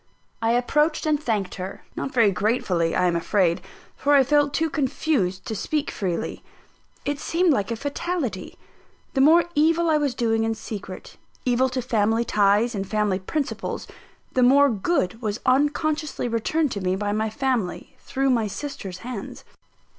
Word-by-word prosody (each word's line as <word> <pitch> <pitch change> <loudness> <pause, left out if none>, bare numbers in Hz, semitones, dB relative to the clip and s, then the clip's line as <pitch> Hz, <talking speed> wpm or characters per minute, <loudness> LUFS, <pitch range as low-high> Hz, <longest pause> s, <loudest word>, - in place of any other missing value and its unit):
I 225 +1 +2
approached 300 +7 +1
and 305 -1 +1
thanked 210 -9 -1
her; 190 +2 -7
not 270 - -3
very 230 -6 +4
gratefully, 185 -5 0
I - - +2
am 175 -1 +2
afraid, 170 0 +1 0.3
for 290 +1 +2
I 275 - +7
felt 290 +1 +3
too 325 +3 +1
confused 270 - -1
to 220 - -3
speak 295 +8 -2
freely. 180 -4 -3 0.6
It 285 0 -2
seemed 335 +1 +2
like 205 -4 -1
a 230 - -1
fatality. 285 - -3 0.6
The 270 - +2
more 325 +5 +6
evil 325 +2 +3
I 305 - +3
was 285 -4 -1
doing 225 -2 +1
in 225 0 0
secret, 205 -3 -8 0.3
evil 255 +1 +2
to 255 -1 -3
family 225 -1 +1
ties 210 +3 +3
and 195 -2 -4
family 210 -3 +1
principles, 280 +9 -3 0.5
the 255 - +2
more 275 +2 +6
good 225 - -1
was 215 -1 -2
unconsciously 295 +1 +1
returned 255 +6 0
to 200 - -3
me 185 0 0
by 205 +1 -2
my 215 +1 0
family, 240 -5 -2
through 270 0 0
my 230 -4 +1
sister's 205 -6 -6
hands. 240 -6 -6
240 Hz, 160 wpm, -24 LUFS, 205-290 Hz, 0.6 s, I